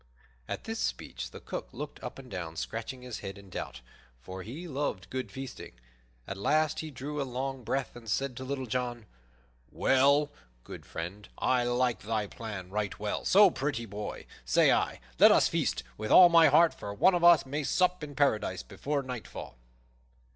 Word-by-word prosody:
At - - -4
this - - -4
speech - - -3
the - - -10
Cook - - -6
looked - - -7
up - - -6
and 135 -1 -11
down, 85 -6 -6
scratching 115 +8 -5
his 125 -3 -6
head 100 -1 -7
in 100 -2 -14
doubt, - - -6 0.4
for 95 +8 -8
he 140 - -7
loved 140 - -3
good 130 0 -4
feasting. 135 -1 -8 0.5
At 100 - -6
last 155 +9 +1
he 160 - -4
drew 145 +2 -5
a - - +1
long 130 0 -4
breath 130 +4 -2
and 115 -2 -10
said 135 +5 -1
to 130 - -5
Little 130 0 -3
John, 120 -1 -3 0.7
"Well, 140 +2 +3 0.3
good - - -10
friend, 90 +5 -6
I 125 -1 +2
like 120 -3 +1
thy 110 0 -1
plan 100 -4 -7
right 105 -1 -2
well; 105 0 -3
so, 200 -1 +7
pretty 135 -6 -2
boy, 105 0 -6 0.2
say - - +4
I, - - 0 0.2
let - - +9
us - - +5
feast, - - -1 0.2
with 110 0 -3
all 180 -1 +9
my 165 -1 +7
heart, 170 -1 +5
for 100 - -7
one 185 - +5
of 175 -1 0
us 175 -3 +7
may 145 +3 -3
sup 180 +3 +1
in 145 -1 -7
Paradise 110 -9 +1
before 140 +8 -3
nightfall." 125 - -7
125 Hz, 185 wpm, -30 LUFS, 105-140 Hz, 0.7 s, let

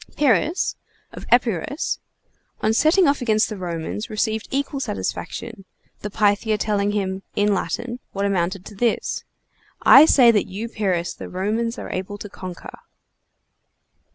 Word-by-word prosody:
Pyrrhus, 300 +5 +2 0.4
of - - -10
Epirus, 245 - +1 0.6
on 220 - +1
setting 330 - +4
off 280 -1 +1
against 215 -3 +2
the 215 - -5
Romans, 175 +2 -4
received 220 0 -1
equal 275 0 -2
satisfaction, 230 -5 -4 0.4
the 210 - -5
Pythia 210 +1 +1
telling 205 -1 0
him 190 -2 -2
(in 205 0 +2
Latin) 235 +7 -3
what 200 0 -2
amounted 185 -1 -1
to - - -10
this: 230 +3 -1 0.6
"I 275 +4 +9
say 250 -6 +6
that 210 -3 +1
you 200 +4 -5
Pyrrhus 185 -6 -1
the - - -9
Romans 220 +6 -1
are - - -6
able 190 +2 -4
to 205 - -8
conquer!" 185 -2 -9
210 Hz, 140 wpm, -22 LUFS, 195-235 Hz, 0.6 s, I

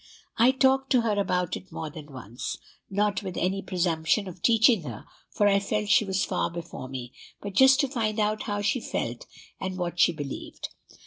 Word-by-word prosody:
I 235 +3 +7
talked 265 0 +3
to 250 - +5
her 225 -2 +1
about 180 -3 0
it 190 - -10
more 155 -2 -5
than 150 -1 -10
once, 120 -2 -6 0.3
not 205 0 0
with 190 -3 -6
any 190 +2 0
presumption 175 +1 0
of 180 -1 -9
teaching 225 -2 +5
her, 120 -8 -8 0.2
for 205 - +2
I 200 -1 +4
felt 210 +1 -2
she 210 +2 +5
was 190 0 0
far 185 - -1
before 170 -6 -7
me, 125 -2 -7 0.3
but 200 -1 -6
just 265 +5 +6
to 280 - +1
find 225 -4 -1
out 215 0 +1
how 205 0 -1
she 205 +5 +1
felt - - -4 0.3
and 185 -1 -4
what 175 -1 -3
she - - +6
believed. 145 -4 -6
195 Hz, 195 wpm, -27 LUFS, 170-215 Hz, 0.3 s, I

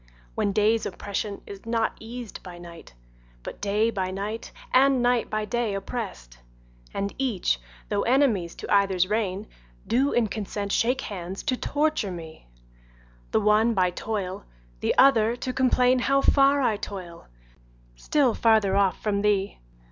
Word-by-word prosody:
When 200 - 0
day's 215 +2 +2
oppression 200 0 -5
is 200 -1 -10
not 230 -1 0
eas'd 235 0 -8
by 180 -2 -10
night, 170 - -12 0.5
But - - -8
day 210 +3 +1
by 190 -3 -2
night 205 +4 -5 0.2
and 265 -1 +4
night 245 -1 +2
by 215 0 -1
day 225 -1 -1
oppress'd, 195 - -6 0.5
And 200 0 -3
each, 205 - 0 0.3
though - - 0
enemies 235 -10 +2
to - - -3
either's 195 -3 +3
reign, 205 -1 -1 0.4
Do 270 +4 +2
in 240 - +2
consent 205 -1 -4
shake 250 +5 +1
hands 190 -1 -6
to 265 -4 0
torture 295 -5 0
me, 160 - -9 0.8
The - - +1
one 215 +2 +3
by 180 -2 +2
toil, 190 -1 -4 0.4
the - - 0
other 235 -4 +5
to 255 +1 -4
complain 255 0 +3
How 275 +2 +2
far 275 0 +4
I 220 -4 +2
toil, 180 -5 -8 0.7
still 260 - +1
farther 215 -4 +3
off 195 -3 +2
from 200 -2 0
thee. 205 -1 0
210 Hz, 150 wpm, -25 LUFS, 195-240 Hz, 0.8 s, other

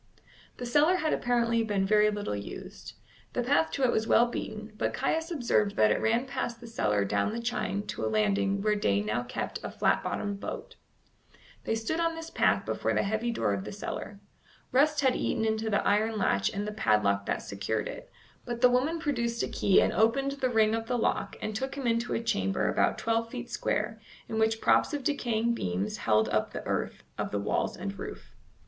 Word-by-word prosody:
The 245 - -5
cellar 295 +9 +4
had 315 -4 0
apparently 235 -1 +1
been 205 -3 0
very 210 +1 +4
little 205 - -3
used. 100 0 -8 0.4
The - - 0
path 160 0 +3
to 275 - -1
it 250 - +4
was 220 +1 0
well 235 - +6
beaten, 215 -2 -6
but - - -1
Caius 325 +1 0
observed 235 - +1
that 105 -1 +4
it - - +1
ran 230 +3 +2
past 255 -3 -3
the 240 - -11
cellar 105 - 0
down 100 - 0
the 230 - -3
chine 210 -4 -2
to - - -5
a - - +1
landing 200 -2 +1
where 215 0 +3
Day 100 - +1
now 105 +3 -1
kept 120 - -4
a - - -3
flat - - +1
bottomed 205 -1 -3
boat. - - -6 0.9
They 225 - 0
stood 225 +9 -2
on 330 -1 +1
this 325 0 -7
path - - +2
before - - -1
the - - +2
heavy 220 +4 -1
door 220 - 0
of 100 -1 -3
the - - -6
cellar. 200 0 -6 0.5
Rust 295 +3 +3
had 260 -2 +3
eaten 220 - 0
into 220 0 0
the 205 - +1
iron 215 +2 +2
latch 100 - +2
and 205 +1 -3
the - - -2
padlock 105 - +1
that - - -1
secured 100 +2 -2
it, - - -8 0.3
but 240 -1 -5
the 250 -1 +6
woman 270 +7 +2
produced 235 -7 -1
a - - 0
key 195 - +3
and - - 0
opened 250 +6 +2
the 275 -2 -1
ring 220 -2 +3
of 225 0 -2
the 245 - 0
lock 225 - 0
and 215 - -3
took 265 +5 -3
him 275 -2 -5
into 230 0 +1
a 230 - -2
chamber 95 - 0
about - - +2
twelve 230 0 0
feet 245 0 -7
square, 215 +1 -1 0.3
in 220 - -2
which 220 0 +2
props - - +3
of 285 - -4
decaying 235 -5 0
beams 95 - -2
held 110 0 +2
up 110 0 0
the - - -6
earth - - -2 0.2
of - - -1
the 105 - -2
walls 100 - -1
and 195 +1 -5
roof. - - -8
220 Hz, 210 wpm, -29 LUFS, 195-245 Hz, 0.9 s, well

